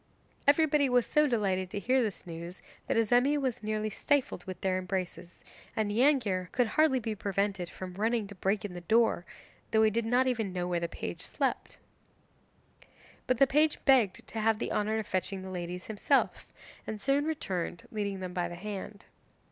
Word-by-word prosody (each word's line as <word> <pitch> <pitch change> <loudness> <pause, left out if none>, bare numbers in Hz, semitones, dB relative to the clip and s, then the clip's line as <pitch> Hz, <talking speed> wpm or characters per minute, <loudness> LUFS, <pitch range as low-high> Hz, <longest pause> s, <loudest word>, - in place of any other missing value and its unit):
Everybody 295 -1 +4
was 245 -1 +3
so 300 0 +3
delighted 195 -7 0
to 205 - -4
hear 255 +5 +2
this 215 -5 -3
news 170 +1 -8 0.2
that - - +1
Azemi 245 +6 +3
was 260 -6 -2
nearly 215 0 -2
stifled 270 -5 0
with 185 -2 -6
their 185 -1 +1
embraces, 180 -2 -5 0.3
and 215 -2 0
Neangir 220 -7 +2
could 245 - +3
hardly 305 -2 +3
be 225 -2 -3
prevented 195 -3 -1
from 185 -1 -8
running 220 +3 0
to 200 - -10
break 195 +2 -1
in 195 - -5
the 175 - -7
door, 220 -2 +2 0.4
though 220 0 +4
he 215 - +4
did 230 +1 0
not 250 +3 +3
even 225 -6 0
know 180 -1 -2
where 175 -1 0
the 170 - -2
page - - -6
slept. - - -2 1.5
But 255 - +2
the 275 - +7
page 300 +3 +3
begged 245 -9 +4
to 225 - -4
have 220 0 +2
the - - -3
honour 215 +1 0
of 220 - -2
fetching 190 0 -2
the 190 - -7
ladies 180 0 -5
himself, 215 -2 +1 0.4
and 215 - -4
soon 275 +5 +1
returned 185 - -3
leading 200 -3 -3
them 180 -1 -5
by 175 -1 -1
the 175 - -7
hand. 200 +2 -7
210 Hz, 185 wpm, -30 LUFS, 185-245 Hz, 1.5 s, the